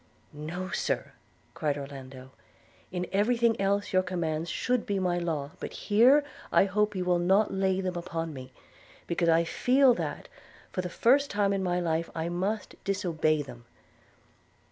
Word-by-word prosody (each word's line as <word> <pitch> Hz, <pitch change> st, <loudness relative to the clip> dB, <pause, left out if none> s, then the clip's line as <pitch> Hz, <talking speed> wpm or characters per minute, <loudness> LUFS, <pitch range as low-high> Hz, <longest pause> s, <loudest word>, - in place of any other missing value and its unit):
'No, 170 Hz, +5 st, -5 dB
Sir,' -, -, -2 dB, 0.4 s
cried 145 Hz, -2 st, -1 dB
Orlando: 135 Hz, -2 st, -9 dB, 0.6 s
'in 180 Hz, 0 st, -2 dB
every 210 Hz, +5 st, +2 dB
thing 230 Hz, -3 st, +2 dB
else 200 Hz, +1 st, 0 dB
your 185 Hz, -, +5 dB
commands 170 Hz, -3 st, -2 dB
should 250 Hz, +4 st, -1 dB
be 200 Hz, -, 0 dB
my 180 Hz, -2 st, 0 dB
law; 155 Hz, -4 st, -2 dB
but -, -, -6 dB
here 245 Hz, +8 st, +4 dB, 0.3 s
I -, -, +5 dB
hope 210 Hz, +1 st, 0 dB
you 185 Hz, -1 st, -2 dB
will 180 Hz, -1 st, +2 dB
not 190 Hz, +5 st, +3 dB
lay 190 Hz, 0 st, +1 dB
them 185 Hz, -1 st, -3 dB
upon 165 Hz, -2 st, -4 dB
me, 130 Hz, -2 st, -9 dB, 0.5 s
because 170 Hz, 0 st, 0 dB
I 165 Hz, +1 st, +5 dB
feel 255 Hz, +9 st, +4 dB
that, -, -, -4 dB, 0.4 s
for 185 Hz, -, -2 dB
the 180 Hz, -, -5 dB
first 275 Hz, +10 st, +3 dB
time 200 Hz, -1 st, +1 dB
in 195 Hz, -, -1 dB
my 180 Hz, -1 st, 0 dB
life, 165 Hz, -1 st, -1 dB
I 165 Hz, +1 st, -2 dB
must 190 Hz, +4 st, -3 dB
disobey 165 Hz, -6 st, 0 dB
them.' 120 Hz, -3 st, -12 dB
180 Hz, 165 wpm, -28 LUFS, 165-200 Hz, 0.6 s, your